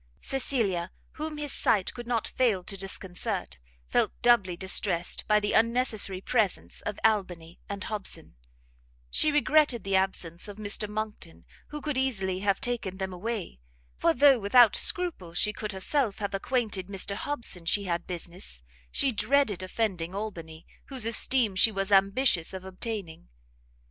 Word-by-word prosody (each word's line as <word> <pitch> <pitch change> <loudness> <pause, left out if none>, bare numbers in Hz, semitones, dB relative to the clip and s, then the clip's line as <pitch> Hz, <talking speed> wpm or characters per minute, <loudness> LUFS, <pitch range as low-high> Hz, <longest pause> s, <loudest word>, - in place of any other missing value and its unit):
Cecilia, 215 -10 0 0.2
whom 310 0 -5
his 295 -1 -3
sight 195 -4 +1
could 240 -1 -8
not 235 -3 0
fail 225 -8 +1
to 195 - -6
disconcert, 190 - -2 0.3
felt - - +1
doubly 205 -8 +4
distressed 185 -1 +1
by 210 0 +4
the 205 0 -1
unnecessary 225 -5 +2
presence 215 -3 0
of 210 - -4
Albany 180 -6 0
and 200 0 -4
Hobson; 195 -6 -4 0.8
she 305 - +2
regretted 295 -5 +3
the 195 0 0
absence 190 -2 0
of 205 -1 -9
Mr 210 0 0
Monckton, 210 - -6 0.2
who 300 0 -7
could 295 -3 -2
easily 195 -8 0
have 200 0 +1
taken 225 -6 -3
them 190 -1 -4
away; 195 - -5 0.4
for 165 - +2
though 270 - +5
without 225 +2 +5
scruple 310 - -1
she 210 +4 +2
could 210 0 -5
herself 210 +3 0
have 200 -2 -4
acquainted 205 -3 -1
Mr 200 0 -1
Hobson 215 -8 -3
she 200 +4 +3
had 175 -3 -3
business, 170 - -6 0.3
she 270 - +2
dreaded 240 -4 +1
offending 185 -3 -2
Albany, 165 -6 -7 0.2
whose 260 -5 +1
esteem 230 -2 +4
she 220 +4 +5
was 195 0 -2
ambitious 195 -2 +3
of 190 0 -8
obtaining. 190 - -6
205 Hz, 150 wpm, -28 LUFS, 185-235 Hz, 0.8 s, though